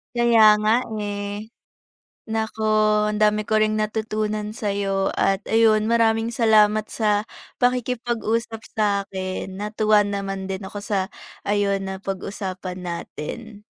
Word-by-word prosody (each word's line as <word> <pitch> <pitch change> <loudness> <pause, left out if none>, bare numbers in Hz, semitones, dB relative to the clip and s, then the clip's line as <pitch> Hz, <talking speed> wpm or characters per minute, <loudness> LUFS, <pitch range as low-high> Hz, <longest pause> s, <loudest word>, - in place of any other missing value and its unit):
Kaya 230 -3 +6
nga, 215 +1 +4 0.3
eh. 205 +2 -5 0.8
Naku, 220 0 -2 0.5
ang 210 - -2
dami 215 0 +3
ko 215 +1 +1
ring 215 0 +2
natutunan 215 0 -2
sa'yo 200 -3 -1
at 195 +1 +1
ayun, 220 -1 +4
maraming 225 0 +2
salamat 215 -2 +4
sa 210 -1 0 0.3
pakikipag-usap 235 -2 -1
sa'kin. 195 -3 -2
Natuwa 210 0 +2
naman 195 -1 -3
din 190 +1 -4
ako 205 +2 -7
sa 200 -1 -1 0.4
ayun, 200 -1 0
napag-usapan 190 -1 -5
natin. 205 +6 -7
210 Hz, 110 wpm, -23 LUFS, 200-220 Hz, 0.8 s, Kaya